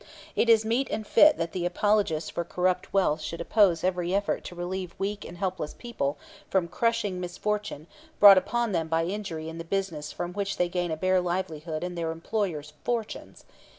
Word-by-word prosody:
It 235 - +2
is 220 -1 +6
meet 240 +5 0
and 215 - -3
fit 300 +8 +6
that 165 0 -2
the 180 - -3
apologists 175 -3 +1
for 170 - -2
corrupt 180 +1 -1
wealth 160 -6 +2
should 155 +2 -5
oppose 175 -2 +3
every 180 0 0
effort 200 0 0
to 175 - -7
relieve 180 0 -4
weak 200 +1 -3
and 175 - -9
helpless 185 -5 -3
people 155 - -3 0.3
from 185 -3 +1
crushing 220 -1 0
misfortune 185 -2 -3 0.3
brought 200 -2 +10
upon 235 +3 -1
them 165 -3 0
by 165 +1 +1
injury 175 -4 -4
in 165 +1 -7
the - - -4
business 165 -4 -3
from 175 +1 -5
which 200 0 -2
they 180 -1 +1
gain 175 0 -1
a 160 - -2
bare 185 +2 +2
livelihood 170 -3 -3
and 180 0 -4
their 165 -1 -2
employers 165 -3 -3
fortunes. 230 -3 -4
180 Hz, 185 wpm, -27 LUFS, 165-205 Hz, 0.3 s, brought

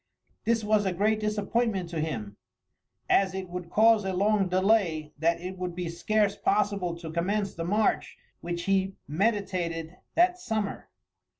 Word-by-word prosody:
This 230 -1 +2
was 210 -1 +2
a 185 - 0
great 215 +4 +1
disappointment 210 -2 0
to 165 - -2
him, 110 -10 -4 0.7
as 190 -1 +3
it 190 -1 -5
would 180 -1 -6
cause 220 +2 +5
a 190 0 -2
long 200 +1 +2
delay 185 -5 +2
that 170 +2 +2
it 180 +1 -7
would 180 -1 -3
be 175 -2 -3
scarce 205 +4 +1
possible 200 -5 0
to 165 -2 -7
commence 195 +4 -1
the 165 - -4
march 210 +5 +1 0.2
which 175 0 -4
he 195 0 +1
meditated 180 -2 -1 0.2
that 360 +1 +4
summer. 215 - -3
190 Hz, 155 wpm, -28 LUFS, 170-210 Hz, 0.7 s, cause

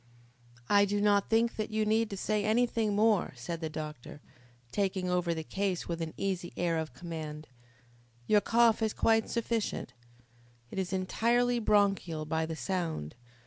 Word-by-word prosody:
"I 200 0 +5
do 205 +1 -1
not 205 -1 +3
think 230 +1 +2
that 215 0 -2
you 215 0 0
need 215 -1 +1
say 210 +2 0
anything 220 -1 +1
more," 210 -2 +3
said 160 +8 -5
the 160 - -2
doctor, 150 -3 -7 0.5
taking 190 0 -1
over 180 -1 +1
the 160 - -4
case 190 +1 -2
with 170 -1 -3
an 160 -1 -4
easy 185 -3 -2
air 170 -2 +1
of 155 -6 -5
command. 155 0 -6 0.8
"Your 210 - +4
cough 230 0 +3
is 220 -1 +1
quite 225 -1 +2
sufficient. 230 - -2 0.8
It - - -3
is 185 -1 -2
entirely 235 +6 +1
bronchial 195 -7 +1
by 160 +1 -1
the 160 - -4
sound. 165 - -3
195 Hz, 155 wpm, -31 LUFS, 165-215 Hz, 0.8 s, I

